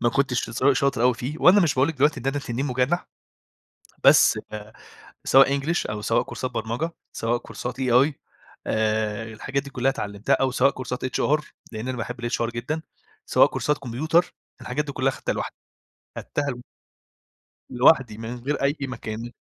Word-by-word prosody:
ما 120 - +3
كُنتش 130 -2 0
س 115 - -5
شاطر 135 -2 +1
أوي 125 -1 +4
فيه 130 +6 -5
وأنا 195 +3 +7
مش 160 -7 +2
باقول 130 +3 +3
لِك 160 - -3
دلوقتي 145 +2 +2
إن 130 - -7
أنا 135 +1 0
تنين 135 0 -3
مُجنح 130 +6 0 1.0
بس - - +6
آآ 105 0 -8 0.5
سواء 135 +1 +5
English، 165 -4 -1
أو 105 0 -4
سواء 115 +2 +2
كورسات 130 - -5
برمجة 120 +7 -3 0.2
سواء 115 +1 -1
كورسات 125 +2 -7
AI 130 +4 +4 0.5
آآ 110 0 0
الحاجات 135 +5 -3
دي 140 - -10
كلّها 130 0 +1
اتعلِمتّها 100 -5 -3
أو 135 - +1
سواء 130 +2 +3
كورسات 125 -1 -5
HR 150 +4 +1 0.3
لأن 110 +3 -5
أنا 130 - -2
باحب 120 +1 -4
الHR 115 -1 -1
جدًا 145 +7 -4 0.4
سواء - - +5
كورسات 150 0 -1
كمبيوتر 155 +8 0 0.3
الحاجات 145 +4 -2
دي 145 - -6
كلّها 135 0 +1
خدّتها - - -3
لوحدّي، - - -5 0.6
خدّتها 145 - -3 1.2
لوحدّي 125 -3 +4
من 115 +2 -6
غير 135 +4 -3
أي 140 +2 +2
مكان. 120 -3 -5
130 Hz, 165 wpm, -24 LUFS, 115-140 Hz, 1.2 s, وأنا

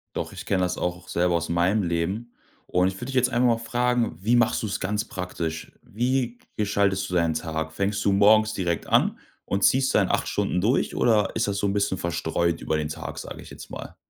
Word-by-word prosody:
Doch, - - -3
ich - - -8
kenne 95 -2 +1
das 90 0 -1
auch, 90 0 -1
auch 90 - -18
selber 85 0 +1
aus 85 0 -1
meinem 90 +5 +2
Leben. 95 +8 -2 0.3
Und 90 +1 +2
ich 95 - -2
würde 100 - -7
dich 135 - -5
jetzt 125 -1 +3
einfach 125 0 +2
mal 115 -1 +3
fragen: 120 -2 0
Wie 115 +4 +3
machst 120 0 +3
du's 105 -3 -2
ganz 105 +3 -1
praktisch? 90 -5 -5
Wie 125 +1 -1 0.2
gestaltest 100 -2 +1
du - - -6
deinen 85 -2 +2
Tag? 80 0 -3
Fängst 100 +3 -1
du 100 - +4
morgens 110 +2 +5
direkt 85 -4 -2
an - - +3 0.3
und 100 0 -1
ziehst 130 0 +4
da - - +6
in - - 0
8 - - 0
Stunden 90 - 0
durch, 120 +7 +1
oder 105 -4 +3
ist - - +1
das 100 -1 -1
so 100 - 0
'n 100 - 0
bisschen 100 -2 0
verstreut 85 0 -1
über 80 - 0
den 75 -1 -2
Tag, 80 - -6
sage - - -8
ich - - -12
jetzt - - -11
mal? - - -8
100 Hz, 230 wpm, -25 LUFS, 85-115 Hz, 0.3 s, da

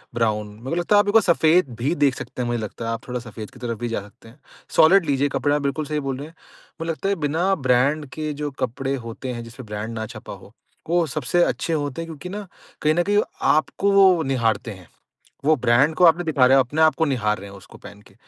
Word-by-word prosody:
Brown. 110 -2 0
मेरे 115 +5 -9
को - - -1
लगता 175 +4 +1
है, - - +7
आप 205 - +2
एक 205 - +1
बार 225 - +7
सफेद 165 -3 +3
भी 135 +7 0
देख 135 -3 +2
सकते - - -7
हैं, 120 - -1
मुझे 120 -1 -1
लगता 110 +2 -6
है, 115 - -2
आप 115 - -6
थोड़ा 125 0 -3
सफेद 110 -2 -9
की 125 - -16
तरफ 115 -2 -4
भी 120 - -2
जा 115 - -2
सकते 105 +3 -16
हैं। 125 +6 -19 0.4
सॉलिड 185 +3 +6
लीजिए 145 -1 +1
कपड़ा, 145 0 +1
बिल्कुल 140 +2 -2
सही 150 +1 -2
बोल 130 - -2
रहे 145 +3 -7
हैं। 165 - -17 0.5
मुझे 165 0 -1
लगता 195 +5 -3
है, 200 - +1
बिना 170 +6 +1
ब्रांड 140 +2 +1
के 155 -1 -3
जो 145 - -2
कपड़े 135 +2 -2
होते 125 +2 -6
हैं, 120 - -6
जिसमें 115 +2 -11
ब्रांड 105 +2 -5
ना 110 - -3
छपा - - -8
हो, - - -14 0.4
वो 175 0 +3
सबसे 155 +5 +1
अच्छे 165 - -1
होते 145 0 -2
हैं 165 - -6
क्योंकि 160 +3 -8
ना, 205 0 -6 0.3
कहीं 155 0 +3
न 175 - +2
कहीं 205 +2 +2 0.3
आपको 190 +6 +1
वो 190 -4 +5
निहारते 115 -4 0
हैं। 95 -3 -12 0.6
वो 155 - +5
ब्रांड 130 +4 +3
को 180 - +1
आप 165 -2 +7
नहीं 175 - -4
दिखा 145 -5 +3
रहे, 135 +2 +5
आप 130 - +4
अपने 150 +5 -1
आपको 160 +1 +4
निहार 110 -7 0
रहे 100 +1 -10
हैं, 100 - -12
उसको 90 - -15
पहन 100 +1 -13
के। - - -21
140 Hz, 255 wpm, -22 LUFS, 120-160 Hz, 0.6 s, है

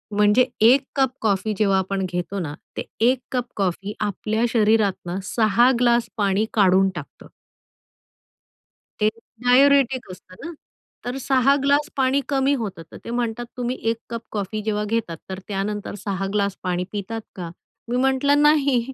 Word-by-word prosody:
म्हणजे 210 +4 +4 0.2
1 260 +4 +6
cup 265 -2 +3
coffee 215 0 0
जेव्हा 195 -2 +3
आपण 190 0 -2
घेतो 180 +2 -3
ना 150 -4 -4 0.2
ते - - -2 0.3
1 260 - +1
कप 250 -2 -1
कॉफी 195 +1 -2
आपल्या 215 +2 -1
शरीरातनं 205 -5 +1
6 230 +5 +3
ग्लास 235 -2 +3
पाणी 200 +1 +1
काढून 195 -2 +4
टाकतं. 150 -4 -9 1.7
ते 210 - +4 0.4
डायुरेटिक 260 -2 +4
असतं 185 0 -14
ना, - - -5 0.5
तर 245 +2 -3
6 265 +1 +3
ग्लास 285 +2 +2
पाणी 270 +1 +2
कमी 275 0 +2
होतं. 195 -6 -5
तर - - -9
ते - - -6
म्हणतात, 240 0 -2
"तुम्ही 245 +1 -2
1 230 - -1
कप 230 -1 -4
कॉफी 210 +1 -3
जेव्हा 210 0 -1
घेतात, 205 -8 -1
तर 190 - -4
त्यानंतर 205 +1 -3
6 195 -1 -2
ग्लास 200 -2 0
पाणी 180 -1 -1
पितात 215 +2 -4 0.2
का?" 175 -3 -6 0.4
मी 245 - -1
म्हटलं, 265 +2 +2
"नाही." 285 -4 +4
220 Hz, 150 wpm, -22 LUFS, 195-250 Hz, 1.7 s, 1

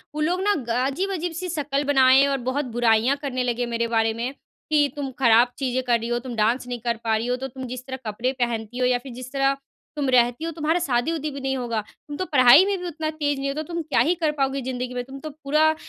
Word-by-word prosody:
वो 305 - -2
लोग 350 +4 +1
ना 410 - +3
ग 245 -5 -7 0.2
अजीब-अजीब 355 +4 -2
सी 360 +2 -4
शक्ल 290 -3 -1
बनाए 265 +1 +6
और 275 -1 0
बहुत 285 +2 -1
बुराइयाँ 240 +3 +3
करने 255 -3 -2
लगे 245 0 -1
मेरे 235 0 -1
बारे 225 -1 +1
में 240 +4 -3
कि, 295 +1 -1
"तुम 280 -2 -4
खराब 240 -1 +5
चीज़ें 260 -1 -1
कर 240 -2 +2
रही 230 - -5
हो, 240 0 0
तुम 245 -1 -7
डांस 235 +4 +1
नहीं 245 -1 -4
कर 235 0 -2
पा 225 -1 +1
रही 230 - -3
हो। 250 - +1
तो 265 - -4
तुम 260 0 -8
जिस 255 +1 -7
तरह 260 - -4
कपड़े 235 +5 -1
पहनती 235 -1 -2
हो 250 - +2
या 250 0 +3
फिर 260 -1 -10
जिस 255 +1 -9
तरह 275 0 +2 0.4
तुम 280 -2 0
रहती 245 +3 +3
हो 330 - -2
तुम्हारा 320 +2 0
शादी-उदी 305 +2 -1
भी 275 - -6
नहीं 270 0 -1
होगा, 235 -3 -2 0.3
तुम 290 0 -6
तो 370 - -2
पढ़ाई 285 +2 +7
में 400 0 0
भी 360 - -6
उतना 320 -1 -3
तेज़ 290 -2 -1
नहीं 275 0 -2
हो - - -2
तो 310 - -2
तुम 335 +2 -4
क्या 295 -6 0
ही 305 +9 +4
कर 320 -3 0
पाओगी 270 0 0
ज़िन्दगी 250 0 -4
में, 245 - -3
तुम 270 +2 -10
तो 310 +3 -6
पूरा 310 +2 +1
265 Hz, 260 wpm, -24 LUFS, 245-300 Hz, 0.4 s, पढ़ाई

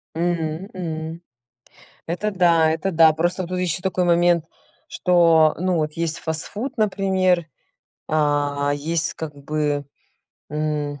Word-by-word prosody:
М 170 +1 -2
м. 160 -2 -5 0.9
Это 195 +6 -2
да 170 -4 +4
это 180 +4 -2
да. 160 -2 +6
Просто 175 +4 -1
вот 175 - -7
тут 180 0 -2
ещё 180 -1 -1
такой 185 -1 0
момент, 175 -1 +3 0.4
что 165 -3 +4
ну 185 0 +1
вот 155 -2 -1
есть 165 0 -2
фастфуд, 200 - -4
например, 190 -4 +1 0.6
а 145 -2 +1
есть 155 +2 -1
как 155 -2 -6
бы 145 0 -2 0.7
м 150 -1 -2
165 Hz, 125 wpm, -22 LUFS, 155-180 Hz, 0.9 s, да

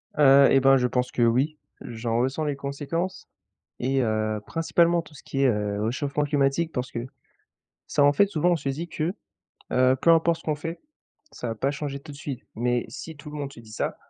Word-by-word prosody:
Heu 140 -1 +7
et 135 - +6
bah, 135 0 +6
je 125 -1 +2
pense 125 0 -1
que - - -2
oui. 130 +7 +2 0.2
J'en 115 0 -2
ressens 130 +5 0
les 145 - -1
conséquences 145 +7 -4 0.5
et 135 +2 +1
heu, 110 -1 0
principalement 170 +1 +2
tout 155 - -17
ce 150 - -14
qui 135 - -3
est, - - +5
heu, 105 -2 0
réchauffement 140 +5 -1
climatique. 145 +3 +1
Parce 125 0 -3
que, - - -3 0.9
ça 145 - +2
en 145 0 +5
fait, 200 +7 +4
souvent 175 -1 +1
on - - +4
se 140 -4 -3
dit, 155 +6 -3
que, 165 +1 -2 0.6
heu, 130 +1 +4
peu 170 - +4
importe 165 0 +4
ce - - -20
qu'on 155 - 0
fait, 165 +3 -6 0.5
ça 120 - -5
va 115 - -2
pas 135 +5 0
changer 140 -1 -5
tout 145 - -11
de 140 - -11
suite 140 -4 -6
mais, 120 +1 0
si 160 +2 -8
tout 150 +1 -10
le 150 - -7
monde 140 -1 -5
se - - -12
dit 110 -2 -16
ça, - - -2
140 Hz, 220 wpm, -25 LUFS, 125-155 Hz, 0.9 s, Heu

